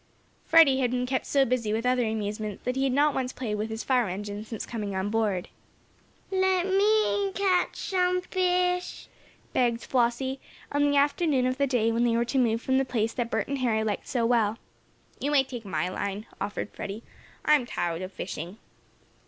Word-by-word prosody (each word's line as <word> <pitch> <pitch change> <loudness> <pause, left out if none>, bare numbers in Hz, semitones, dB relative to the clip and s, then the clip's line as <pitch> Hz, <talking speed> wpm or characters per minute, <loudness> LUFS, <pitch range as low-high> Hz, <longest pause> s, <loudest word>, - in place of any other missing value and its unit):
Freddie 315 -5 +6
had 250 -2 +2
been 250 0 -1
kept 260 +1 -2
so 275 -1 +3
busy 235 -4 0
with 225 +2 -1
other 250 0 +2
amusements, 210 -1 -3
that 250 - -1
he 270 +1 +1
had 270 - +1
not 290 +3 +3
once 255 -1 -2
played 240 -5 -4
with 210 +1 -2
his 220 0 -4
fire 250 -6 +2
engine, 205 +2 -5
since 220 -1 -6
coming 210 -4 -4
on 190 +2 -1
board. 210 -5 0 0.8
"Let 375 -1 +2
me 405 0 +2
catch 380 -3 +1
some 365 -1 +1
fish," 360 -1 0 0.4
begged 240 -2 +1
Flossie, 260 +2 0 0.3
on 290 0 +2
the 285 - +2
afternoon 285 -2 +2
of 255 +1 -1
the 280 - +3
day 235 -3 +2
when 230 +1 +1
they 230 -1 +2
were 235 - +1
to 265 +3 0
move 230 -2 +1
from 260 0 +2
the - - +2
place 230 -4 -1
that 240 -2 -2
Bert - - -1
and 280 0 -2
Harry 225 -4 +1
liked 210 -2 -3
so 240 -4 0
well. 230 -2 +2 0.6
"You 285 - -1
may 290 -2 +4
take 245 -4 -8
my 170 -3 -1
line," 200 +3 -4 0.2
offered 205 +1 -3
Freddie. 205 +4 -6 0.4
"I'm 295 -5 +4
tired 170 -4 -2
of 185 +1 -5
fishing." 180 +1 -6
245 Hz, 195 wpm, -27 LUFS, 215-280 Hz, 0.8 s, Freddie